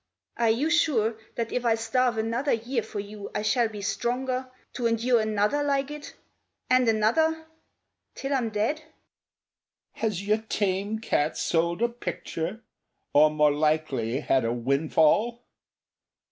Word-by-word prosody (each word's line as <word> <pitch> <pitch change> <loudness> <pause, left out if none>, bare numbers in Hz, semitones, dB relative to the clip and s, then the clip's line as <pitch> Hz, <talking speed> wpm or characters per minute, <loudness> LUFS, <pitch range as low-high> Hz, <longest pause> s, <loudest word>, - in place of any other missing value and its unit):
Are 235 -1 +2
you 270 +9 +1
sure 240 -10 +2 0.2
That 230 -1 -3
if 250 - -1
I 230 -2 +3
starve 230 +1 0
another 230 +6 0
year 235 +2 -1
for 210 - -6
you 205 0 -7
I 210 - -1
shall 225 +2 +2
be 210 -2 -8
stronger 255 +4 -2 0.2
To 240 -2 0
endure 230 +1 +2
another 215 +6 +1
like 280 -1 0
it 295 -1 -8 0.6
and 255 -2 +5
another 315 +10 +2 0.7
till 275 +1 -3
I'm 250 -4 0
dead?" 220 +9 -1 1.1
"Has 205 -4 -3
your 215 +1 +3
tame 205 -1 -1
cat 155 -8 0
sold 170 +5 0
a - - +4
picture? 210 -2 -5 0.5
or 150 +1 +6
more 150 -1 +3
likely 145 -5 0
had 135 -4 +2
a 115 - 0
windfall? 155 - +2
220 Hz, 140 wpm, -26 LUFS, 190-250 Hz, 1.1 s, or